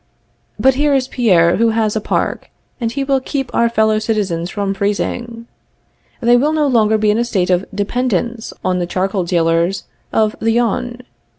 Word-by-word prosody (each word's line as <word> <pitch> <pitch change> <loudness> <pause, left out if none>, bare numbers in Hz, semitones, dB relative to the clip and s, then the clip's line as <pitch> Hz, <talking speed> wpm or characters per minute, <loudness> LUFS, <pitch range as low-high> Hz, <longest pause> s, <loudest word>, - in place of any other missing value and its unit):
] - - -44 0.2
But 265 - +4
here 285 +2 +2
is 260 -1 0
Pierre, 180 -10 +3
who 230 0 +3
has 215 -1 +1
a 220 - -1
park, - - -2 0.3
and 230 -2 -2
he 275 +2 -2
will 270 -1 +1
keep 270 -1 -4
our 235 0 +2
fellow 220 -1 +2
citizens 195 -6 -2
from 200 -1 -2
freezing. 230 +4 -3 0.8
They 240 +1 +5
will 295 +5 +1
no 305 -1 +1
longer 220 -5 +3
be 215 -1 +2
in 215 - 0
a - - +2
state 190 -6 0
of 180 +2 +1
dependence 230 +2 -2
on 180 0 +1
the 175 - -2
charcoal 190 +1 -1
dealers 170 +2 +1 0.3
of 215 -1 +1
the 225 0 +1
Yonne. 240 +1 -1
220 Hz, 185 wpm, -17 LUFS, 195-240 Hz, 0.8 s, They